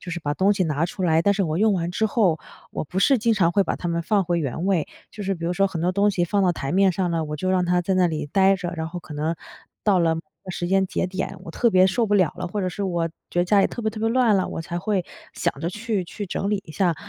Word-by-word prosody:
就 180 - -8
是 175 - -3
把 145 -1 -2
东 195 +2 +3
西 190 -3 +1
拿 155 +1 0
出 185 +2 -6
来， 165 -2 +3
但 200 +3 +3
是 195 - 0
我 160 -1 -1
用 215 0 +3
完 170 -1 -1
之 220 +5 +1
后， 195 -8 +2 0.3
我 - - -3
不 180 +6 -4
是 270 +6 +4
经 230 0 +2
常 170 -4 +2
会 200 - +4
把 - - -2
它 175 - -4
们 170 0 0
放 195 +3 +1
回 170 0 0
原 150 +4 -3
位， 185 -6 +1 0.2
就 210 - -8
是 195 0 -1
比 170 - -7
如 175 - 0
说 195 +2 +2
很 170 -4 -4
多 180 +1 +1
东 205 +2 +3
西 175 -3 0
放 200 +3 +1
到 185 - +4
台 140 -4 -3
面 195 +1 +4
上 180 0 -1
了， 165 -1 0
我 150 0 -5
就 185 +5 -1
让 185 -1 +2
它 180 0 +2
在 190 +2 -1
那 185 -1 +4
里 155 -3 -2
呆 195 +5 +3
着， 175 -1 -4
然 160 0 -3
后 175 +1 -6
可 155 - -11
能 155 +3 -1 0.5
到 200 -4 +4
了 165 -1 +2
某 165 - -4 0.2
个 185 - -6
时 175 -1 -3
间 190 +1 +2
节 180 - -1
点， 190 +1 -4
我 - - -7
特 240 - +2
别 185 -1 +5
受 220 +5 +1
不 205 - +1
了 185 -6 +3
了， 180 0 -4
或 205 +3 -3
者 185 - 0
是 185 +3 -5
我 175 -3 0 0.2
觉 175 - -2
得 175 - +4
家 200 +2 +4
里 - - +4
特 - - -6
别 220 - +1
特 215 0 -8
别 225 - +1
乱 235 -2 +3
了， 190 - 0
我 - - -4
才 170 +1 -4
会 195 -2 0 0.3
想 - - 0
着 165 - -1
去 210 -1 -2
去 205 +4 -6
整 195 +2 -2
理 205 -2 0
一 - - -10
下。 175 -1 +1
185 Hz, 335 characters per minute, -23 LUFS, 170-200 Hz, 0.5 s, 别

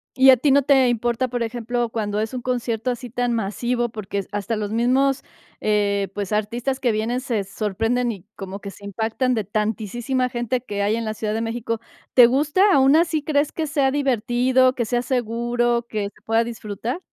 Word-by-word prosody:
¿Y 265 0 +8
a 255 - +6
ti 280 +4 +2
no 280 0 +5
te 270 -2 +4
importa, 240 +2 0
por 245 -1 -2
ejemplo, 240 0 -2
cuando 210 -2 -2
es 220 +3 -2
un 250 - -3
concierto 245 -1 -2
así 245 0 -4
tan 245 0 0
masivo? 235 +3 -1
Porque 200 -3 -4
hasta 205 +2 -2
los 210 -1 -3
mismos, 260 +4 +2 0.4
eh, 200 -2 +1
pues, 205 0 -3
artistas 235 +5 -1
que 245 - +2
vienen 220 +3 -1
se 225 -6 -1
sorprenden, 225 +5 -1
y 195 -4 -9
como 195 +1 -7
que 200 -1 -7
se 200 - -16
impactan 225 +5 -1
de 220 - -1
tantisísima 220 +5 -1
gente 240 +1 -2
que 205 -4 -4
hay 210 +2 +2
en 230 - -3
la 215 - -2
Ciudad 215 0 -3
de 225 - -1
México. 230 0 -3 0.4
¿Te 245 - +10
gusta? 300 - +3
Aun 270 +2 +5
así, 325 -2 +2
¿crees 290 -1 +1
que 320 -2 -3
sea 280 -2 +1
divertido, 255 -1 +2
que 240 - -2
sea 240 +2 0
seguro, 240 -1 0
que 210 -2 -2
se - - -26
pueda 225 +1 +2
disfrutar? 230 - -5
235 Hz, 195 wpm, -22 LUFS, 215-255 Hz, 0.4 s, Te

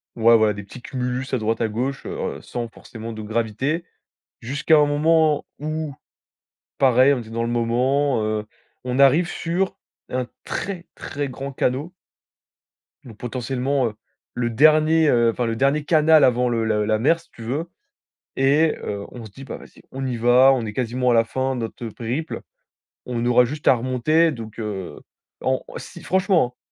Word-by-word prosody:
Ouais, 115 0 +5
voilà. 110 -1 +3
Des 105 0 -7
petits 120 +5 -12
cumulus 125 0 -3
à 130 - +3
droite, 110 0 -1
à 115 - +1
gauche, 130 +6 -3
heu - - -5 0.3
heu - - -13
sans 120 -1 -5
forcément 115 0 -9
de 110 - -7
gravité. 115 +9 -1 0.6
Jusqu'à 140 +6 +2
un 150 - +5
moment 155 +1 +2
où, 155 -1 -3 0.9
pareil, 130 +1 +5
on 130 - -3
était 110 -1 -10
dans 115 +1 -2
le 115 - -2
moment, 125 +2 +1
heu, 110 0 -2 0.4
on 125 +1 -2
arrive 140 +6 +5
sur 185 +4 -2 0.3
un 125 0 -1 0.2
très, 185 -3 -4
très 145 -1 -4
grand 135 +1 -6
canaux. 135 +7 -1 1.1
Donc 115 -4 -12
potentiellement, 130 +2 -1
heu, 105 - -11 0.4
le 120 -1 -1
dernier, 155 +5 +4
heu, 120 -2 +4
enfin 120 - -2
le 115 -1 -1
dernier 140 +4 +1
canal 155 0 +5
avant 125 0 +3
le 115 -2 0
le 105 -1 +1
la 110 0 +1
mer, 160 +8 +3
si 165 - -22
tu 115 - -11
veux. 145 +9 -3 0.7
Et 145 +4 +3
heu, 100 -1 -4
on 120 -2 -9
se 110 - -10
dit: 135 +6 -11
«Bah - - -6
vas-y, - - -16
on 135 0 -4
y 125 -2 -2
va, 125 +3 +6
on 120 -3 -2
est 105 - -5
quasiment 125 +2 0
à 120 - +4
la 115 - +5
fin 130 +3 -2
de - - -3
notre, 120 +2 -6
heu, 115 - -4
périple. 125 +9 -4 0.6
On 120 -1 -3
aura 125 0 +5
juste 145 +5 -2
à - - +7
remonter». 130 +7 +2
Donc, 115 -4 -9
heu 95 -8 -5 0.4
en - - 0
si - - -9
franchement 185 -9 +2
hein, - - -78
125 Hz, 185 wpm, -22 LUFS, 115-145 Hz, 1.1 s, à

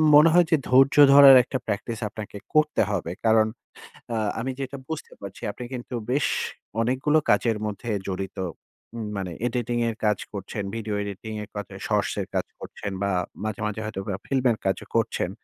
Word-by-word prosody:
মনে 150 +3 +8
হয় 175 -1 +6
যে - - +7
ধৈর্য 135 +1 +5 0.2
ধরার 140 -1 +10
একটা 130 +2 -3
practice 105 +3 -3
আপনাকে 105 -1 -8 0.2
করতে 155 0 +3
হবে। 85 -4 -2
কারণ 110 -1 +5 0.7
আ - - 0 0.2
আমি 130 +3 -2
যেটা 135 +1 -4
বুঝতে 160 -1 -6
পারছি 100 -1 -9
আপনি 125 - -8
কিন্তু 125 0 -6 0.2
বেশ 145 +2 +2 0.5
অনেকগুলো 130 +6 +2
কাজের 115 -3 +3
মধ্যে 105 +3 -5 0.2
জড়িত, 95 0 -4 0.6
ম - - -5 0.2
মানে 95 -2 -3 0.2
editing 120 0 -1
এর 115 - -3
কাজ 105 -2 +2
করছেন, 100 +1 -5
ভিডিও 110 -2 -3
এডিটিং 100 +2 -6
এর 105 - -9
কা 105 - -2 0.3
shorts - - +1
এর - - -3
কাজ - - 0
করছেন 100 - -7
বা 100 - +1 0.3
মাঝে, 110 -1 -3
মাঝে 105 0 -3
হয়তো 110 -3 -4 0.3
film 130 -2 0
এর 110 - 0
কাজও 95 - -1
করছেন। 110 -5 0
110 Hz, 175 wpm, -25 LUFS, 100-130 Hz, 0.7 s, ধরার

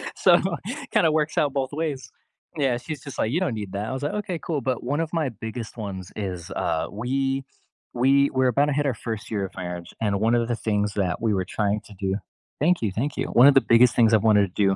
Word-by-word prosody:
so, 175 -2 +5 0.5
kinda 160 - +4
works 155 0 0
out 145 -3 +2
both 135 -2 -1
ways. 145 -6 -3 0.5
Yeah, 135 -5 +1
she's 130 +3 -7
just 140 -2 -8
like, 110 - 0
"You 160 - +1
don't 185 -9 0
need 105 -3 -5
that." 100 +2 -3
I - - -3
was 130 +1 -4
like, 145 - -1
"Okay, 180 -5 -3
cool." 155 -2 -2
But 130 -1 -2
one 140 +5 -1
of 165 0 -2
my 160 -5 0
biggest 115 +1 -7
ones 95 -4 -6
is, 90 -3 -5
uh, 80 -1 -1
we 135 +4 -1 0.5
we 135 +3 +4
we're 130 -1 +2
about 140 +3 +3
to 150 - 0
hit 145 +1 0
our 135 - +1
first 110 -1 -6
year 100 -3 -1
of 95 - -8
marriage, 90 -1 -6
and 100 -3 +1
one 115 +3 +3
of 120 -1 +1
the 120 - 0
things 105 -2 -1
that 90 -3 -1
we 110 -2 +1
were 95 -2 0
trying 105 +2 -1
to 105 - -13
do 95 -1 -1 0.4
Thank 170 0 +2
you, 105 - 0
thank 130 +10 -3
you. - - 0
One 125 +3 +6
of 140 - +6
the 135 - +5
biggest 115 +1 +6
things 115 -1 +4
I've 110 - +5
wanted 105 -1 +5
to 105 - +2
do 95 - +2
120 Hz, 250 wpm, -24 LUFS, 105-140 Hz, 0.5 s, One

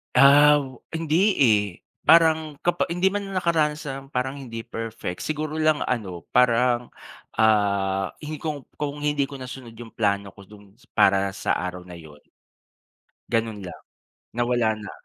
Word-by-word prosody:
Ah, 145 +1 +7 0.3
hindi, 160 -1 -1 0.2
eh. 110 -6 +4 0.4
Parang 160 -2 +5
kapa 175 0 +1
hindi 180 +3 +1
man 200 -1 -4
nakaranas 160 -4 +1
ng 135 -2 -6
parang 130 +3 -2
hindi 115 -4 -7
perfect, 110 -5 -6
siguro 155 0 -3
lang 155 -1 +2
ano, 95 -9 -3
parang, 125 0 +3 0.5
ah, 100 -3 +2 0.2
hindi 150 0 -5
kung 150 -3 -4 0.2
kung 145 0 -4
hindi 145 -2 +1
ko 140 - -10
nasunod 130 -3 -9
yung 115 0 -10
plano 100 -2 -1
ko 100 0 -16
dun 105 -2 -16 0.2
para 95 0 +3
sa - - -2
araw 90 0 -3
na 90 -1 -11
'yon. 75 -2 -15 1.1
Gano'n 115 -2 0
lang. - - -10 0.5
Nawala 120 -1 +1
na. 100 - -8
125 Hz, 145 wpm, -24 LUFS, 105-150 Hz, 1.1 s, Ah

